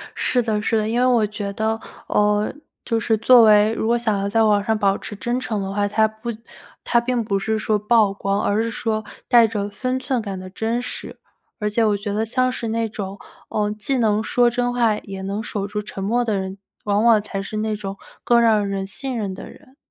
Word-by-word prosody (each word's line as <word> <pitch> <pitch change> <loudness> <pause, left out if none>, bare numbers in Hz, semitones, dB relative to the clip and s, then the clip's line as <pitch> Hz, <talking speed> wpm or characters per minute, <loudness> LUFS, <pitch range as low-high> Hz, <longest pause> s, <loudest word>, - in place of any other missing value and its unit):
是 250 - +1
的 220 -3 -1
是 225 +2 +1
的， 215 0 0
因 230 +2 0
为 250 - +3
我 240 -4 +3
觉 205 -1 -5
得， 220 +2 -1 0.3
呃 210 0 +2 0.3
就 230 -2 0
是 225 +1 +1
作 235 +2 +7
为 210 0 +6
如 220 - -2
果 235 +1 +3
想 220 -4 0
要 200 - -1
在 225 +2 +3
网 210 -2 +4
上 220 +1 +1
保 200 -2 +2
持 210 - -8
真 240 +5 -2
诚 220 -5 -3
的 195 0 -4
话， 205 0 0
它 220 +2 +3
不 220 +2 -8 0.5
它 235 - +3
并 240 0 -1
不 200 -2 0
是 220 +2 -1
说 215 0 +1
曝 210 -1 +3
光， 200 0 -1
而 205 +2 +1
是 230 - -1
说 220 -1 -2 0.3
带 235 -2 +7
着 205 -2 -3
分 255 +5 -2
寸 260 -2 -1
感 200 -3 -5
的 185 0 -8
真 225 +5 -2
实。 250 - -7 0.4
而 210 -1 0
且 225 +2 +1
我 210 -1 +2
觉 205 +1 -4
得 215 +2 0
像 255 +3 +1
是 240 -2 -4
那 225 0 -1
种， 200 -2 -6 0.3
呃， 210 -1 0
既 215 +6 -2
能 215 -3 +2
说 240 +2 +3
真 245 0 -1
话 230 -3 +2
也 195 -2 -8
能 200 +2 -3
守 210 -3 -3
住 205 +1 -3
沉 200 -2 -7
默 240 +5 +1
的 215 -3 0
人， 190 0 -4 0.3
往 205 0 +1
往 225 -3 +6
才 200 -1 -5
是 215 +2 -6
那 215 0 -1
种 200 -1 -6 0.3
更 240 -1 +5
让 215 -3 +3
人 195 -1 -2
信 255 +6 -4
任 200 -4 -3
的 - - -9
人。 260 - -18
215 Hz, 250 characters per minute, -21 LUFS, 205-235 Hz, 0.5 s, 作